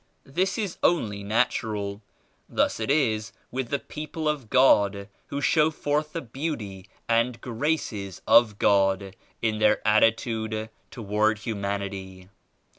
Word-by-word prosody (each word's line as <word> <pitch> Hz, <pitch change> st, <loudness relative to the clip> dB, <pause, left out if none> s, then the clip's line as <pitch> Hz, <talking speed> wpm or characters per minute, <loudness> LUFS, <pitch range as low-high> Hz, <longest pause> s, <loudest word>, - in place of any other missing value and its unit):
This 180 Hz, +7 st, -1 dB
is 205 Hz, -6 st, -3 dB
only 105 Hz, -12 st, +1 dB
natural. 105 Hz, -2 st, -1 dB, 0.5 s
Thus -, -, +1 dB
it 110 Hz, -, -3 dB
is 110 Hz, -8 st, +1 dB, 0.2 s
with 130 Hz, -1 st, -3 dB
the 140 Hz, -, +1 dB
people 155 Hz, +3 st, -6 dB
of 145 Hz, -7 st, -2 dB
God 100 Hz, -6 st, +4 dB, 0.2 s
who 140 Hz, -, -4 dB
show 155 Hz, +1 st, +4 dB
forth 150 Hz, 0 st, -2 dB
the 165 Hz, -, -3 dB
Beauty 115 Hz, -, -5 dB, 0.2 s
and 115 Hz, +1 st, +1 dB
Graces 115 Hz, -, -2 dB
of 110 Hz, -3 st, +5 dB
God 95 Hz, -1 st, +2 dB, 0.3 s
in 110 Hz, -1 st, 0 dB
their 105 Hz, 0 st, +3 dB
attitude 110 Hz, 0 st, +1 dB, 0.2 s
toward 110 Hz, 0 st, 0 dB
humanity. 100 Hz, -3 st, -5 dB
110 Hz, 120 wpm, -26 LUFS, 100-140 Hz, 0.5 s, of